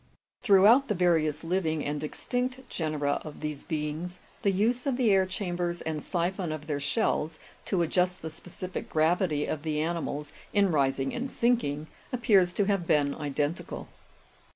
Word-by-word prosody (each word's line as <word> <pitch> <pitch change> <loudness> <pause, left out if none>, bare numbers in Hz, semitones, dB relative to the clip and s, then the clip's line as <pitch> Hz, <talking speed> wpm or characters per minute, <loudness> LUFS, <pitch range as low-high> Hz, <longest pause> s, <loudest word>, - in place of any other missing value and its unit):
" - - -65
Throughout 225 +5 +6
the 210 - 0
various 165 -4 +2
living 165 -3 0
and 145 +1 -2
extinct 250 - -3
genera 150 -3 -1
of 155 - -9
these 150 -2 -4
beings, 160 +3 -3 0.2
the 205 - +3
use 230 +8 +1
of 260 -3 +1
the 240 -5 +3
air 190 -1 +4
chambers 175 -3 -2
and 155 -1 -3
siphon 175 0 -1
of 155 -1 -5
their 150 -2 -2
shells, 155 0 0 0.3
to 180 -4 +1
adjust 180 +2 +1
the 160 - -4
specific 180 +3 -7
gravity 160 -1 +2
of 155 - -3
the 155 -1 -1
animals 155 -2 -2 0.2
in 200 -2 +4
rising 135 -3 +1
and 250 +2 -3
sinking, 230 - +1 0.3
appears 210 -8 +4
to 205 - +1
have 195 -4 0
been 145 -2 +3
identical. 145 +2 -3
170 Hz, 160 wpm, -28 LUFS, 150-195 Hz, 0.3 s, Throughout